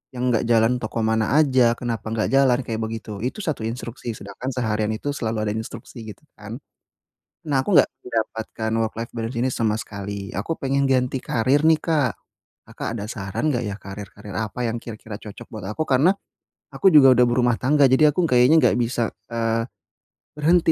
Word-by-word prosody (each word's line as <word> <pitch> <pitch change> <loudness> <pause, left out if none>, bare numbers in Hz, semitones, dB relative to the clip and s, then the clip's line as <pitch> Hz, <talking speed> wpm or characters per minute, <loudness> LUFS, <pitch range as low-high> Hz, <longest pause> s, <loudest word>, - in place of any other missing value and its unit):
yang 125 0 0
enggak 115 - +1
jalan 115 +2 +3
toko 110 +1 -3
mana 110 +5 +1
aja, 130 -6 +4
kenapa 115 -3 -4
nggak 110 -1 -1
jalan 135 -3 +5
kayak 110 -1 -3
begitu 110 -2 -5
itu 125 - -3
1 155 -8 -2
instruksi 120 -1 -6
sedangkan 100 +6 -7
seharian 110 -4 -1
itu 145 +4 -3
selalu 110 -4 -2
ada 105 - -1
instruksi 115 +1 -7
gitu 105 - -12
kan. - - -8 0.8
Nah, 140 -4 0
aku 200 - 0
enggak - - +6 0.2
mendapatkan 110 -1 -3
work 110 - -5
life 115 - -6
balance 115 +2 -3
ini 130 +2 +1
sama 110 -3 0
sekali 100 -1 -6
aku 105 +12 -2
pengen 140 +1 +1
ganti 130 0 +1
karir 135 +7 +1
nih 160 -1 +5
Kak, 150 -8 +1 0.6
Kakak - - -5
ada 105 - -5
saran 100 +8 -2
nggak 125 -3 0
ya 100 -1 -3
karir-karir 100 0 -9
apa 110 +2 -3
yang 115 +1 -2
kira-kira 110 -2 -8
cocok 105 -2 -11
buat 110 -5 -8
aku - - -4
karena, 140 +8 +4 0.6
aku 195 - +3
juga 135 -3 +9
udah 125 0 +5
berumah 120 -1 +2
tangga 145 +2 +3
jadi 150 +3 +5
aku 180 - +2
kayaknya 125 +2 +5
nggak - - +4
bisa, 120 -1 0 0.2
eee, 115 0 -1 0.7
berhenti 165 +2 +4
115 Hz, 185 wpm, -23 LUFS, 110-130 Hz, 0.8 s, juga